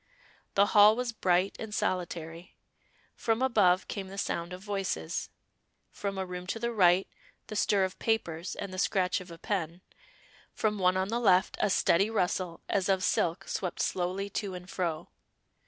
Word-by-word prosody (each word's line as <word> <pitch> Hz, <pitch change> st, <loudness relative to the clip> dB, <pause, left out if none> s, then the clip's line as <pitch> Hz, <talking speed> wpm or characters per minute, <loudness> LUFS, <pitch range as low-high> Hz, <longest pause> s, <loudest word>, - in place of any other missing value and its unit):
The 200 Hz, -, +6 dB
hall 210 Hz, +1 st, +8 dB
was 250 Hz, 0 st, -2 dB
bright 185 Hz, -3 st, +1 dB
and 215 Hz, -2 st, -5 dB
solitary; 170 Hz, -2 st, -3 dB, 0.6 s
from 225 Hz, +2 st, 0 dB
above 205 Hz, -8 st, +3 dB
came 195 Hz, -2 st, -5 dB
the 195 Hz, +1 st, -9 dB
sound 170 Hz, -2 st, -2 dB
of 180 Hz, +1 st, -8 dB
voices, 195 Hz, -, -3 dB, 0.6 s
from 200 Hz, -1 st, -4 dB
a 190 Hz, -, -2 dB
room 180 Hz, 0 st, -7 dB
to 210 Hz, -, -2 dB
the 235 Hz, +1 st, -1 dB
right, 185 Hz, -3 st, +4 dB, 0.4 s
the 215 Hz, -, -7 dB
stir 205 Hz, -1 st, +2 dB
of 185 Hz, -1 st, -3 dB
papers 180 Hz, -6 st, -1 dB
and 200 Hz, -2 st, -6 dB
the 185 Hz, -, -4 dB
scratch 185 Hz, -2 st, +1 dB
of 180 Hz, -, -11 dB
a 170 Hz, -, -9 dB
pen, 175 Hz, -2 st, -3 dB, 0.7 s
from 210 Hz, -1 st, 0 dB
one 185 Hz, 0 st, +3 dB
on 190 Hz, +1 st, 0 dB
the 235 Hz, +2 st, 0 dB
left, 190 Hz, -5 st, +3 dB
a 210 Hz, -, +2 dB
steady 195 Hz, +2 st, +3 dB
rustle 180 Hz, -4 st, -1 dB
as 195 Hz, -1 st, 0 dB
of 190 Hz, -1 st, +2 dB
silk, 170 Hz, +1 st, 0 dB
swept 180 Hz, -3 st, -3 dB
slowly 185 Hz, +2 st, -1 dB
to 200 Hz, -2 st, -3 dB
and 180 Hz, 0 st, -9 dB
fro. 170 Hz, -3 st, -2 dB
190 Hz, 170 wpm, -30 LUFS, 180-205 Hz, 0.7 s, hall